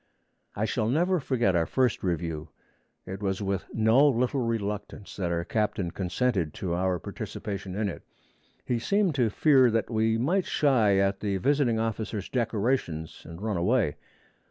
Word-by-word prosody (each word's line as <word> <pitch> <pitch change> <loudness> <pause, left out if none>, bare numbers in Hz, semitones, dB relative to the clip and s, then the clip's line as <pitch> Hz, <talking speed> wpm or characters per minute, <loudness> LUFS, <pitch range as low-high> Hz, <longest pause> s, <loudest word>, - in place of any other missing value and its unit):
I 105 - 0
shall 110 -1 -1
never 175 +7 +2
forget 120 -9 +1
our 85 -1 +2
first 130 -4 +1
review. 85 -3 -3 0.6
It 95 +2 -7
was 95 -1 -1
with 100 -2 -2
no 115 +6 +4
little 125 0 +1
reluctance 105 -3 -4
that 90 -3 -1
our 85 0 -1
captain 105 -5 -1
consented 95 - -1
to 90 -3 -3
our 90 +1 0
participation 95 +2 -6
in 105 0 0
it. 95 - -6 0.6
He 120 -2 0
seemed 195 - +1
to 125 -5 +2
fear 130 +2 +4
that 115 +1 -1
we 110 0 +2
might 170 +10 +1
shy 115 -9 +3
at 95 0 +1
the 100 -2 -1
visiting 135 +1 +2
officers' 110 -2 -3
decorations, 110 - -1
and 85 +4 -9
run 110 -4 -1
away. 95 - +1
110 Hz, 155 wpm, -27 LUFS, 95-125 Hz, 0.6 s, no